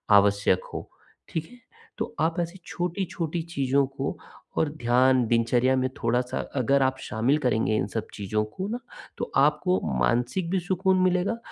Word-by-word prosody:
आवश्यक 100 -2 +4
हो। - - -6 0.4
ठीक 160 -1 -3
है? 245 - -15 0.4
तो - - -4
आप 165 +3 +1
ऐसी 170 +2 -3
छोटी-छोटी 175 -2 -2
चीज़ों 140 -4 +1
को 135 0 -4 0.4
और 160 - +2
ध्यान, 130 -2 +3
दिनचर्या 120 +3 +3
में 130 0 +1
थोड़ा-सा 120 +2 0 0.2
अगर 135 +1 +3
आप 130 0 +1
शामिल 120 +7 +1
करेंगे 110 -2 +2
इन 100 - 0
सब 110 - -2
चीज़ों 105 +1 -1
को 185 - -5
ना, 235 +2 -3 0.4
तो - - -4
आपको 150 +5 +2 0.2
मानसिक 125 - +1
भी 190 0 +1
सुकून 185 +1 +1
मिलेगा 185 +5 +2
135 Hz, 155 wpm, -26 LUFS, 120-175 Hz, 0.4 s, आवश्यक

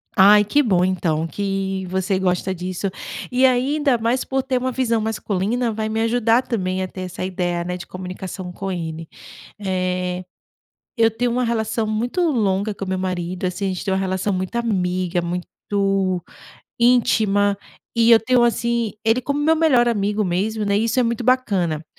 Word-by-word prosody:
Ai, 205 +2 +7
que 285 +9 +2
bom, 185 -7 +2
então, 165 -4 0
que 195 0 -2
você 190 +1 0
gosta 185 0 0
disso! 180 +2 -3 0.4
E 255 +1 +4
ainda 265 +2 +2
mais 235 +3 0
por 270 0 -1
ter 260 -1 -1
uma 255 +1 -1
visão 235 -3 +1
masculina, 220 +2 -1
vai 220 0 -3
me 220 +1 -1
ajudar 230 +1 +3
também 190 -7 -2
a 185 - -2
ter 185 - -8
essa 185 0 -5
ideia, 175 -2 -2
né, 180 +1 -4
de 180 - -9
comunicação 185 0 -7
com 195 +2 -5
ele. 165 -2 -5 0.6
Eh, 185 -1 -1 0.7
eu 225 -1 +5
tenho 240 +2 -1
uma 250 +1 0
relação 220 -1 -1
muito 235 +10 -1
longa 205 -5 0
com 195 - -6
o - - -9
meu 185 0 -1
marido. 185 -1 -3
Assim, 185 +2 -3
a - - +1
gente 185 -1 -4
tem 190 - 0
uma 190 - +1
relação 190 +1 -1
muito 185 +2 -3
amiga, 185 -6 0
muito 175 +1 -4 1.3
íntima. 215 -4 +3 0.4
E 230 0 +5
eu 225 - +7
tenho, 245 +1 +3
assim, 235 -2 0
ele 225 +3 +3
como 280 +3 -2
meu 320 +2 +3
melhor 270 -7 +4
amigo 210 -1 0
mesmo, 205 +4 -1
né. 200 0 +2
E 220 - +1
isso 230 +3 +1
é - - +4
muito 235 0 -1
bacana. 195 - +1
205 Hz, 180 wpm, -21 LUFS, 185-235 Hz, 1.3 s, Ai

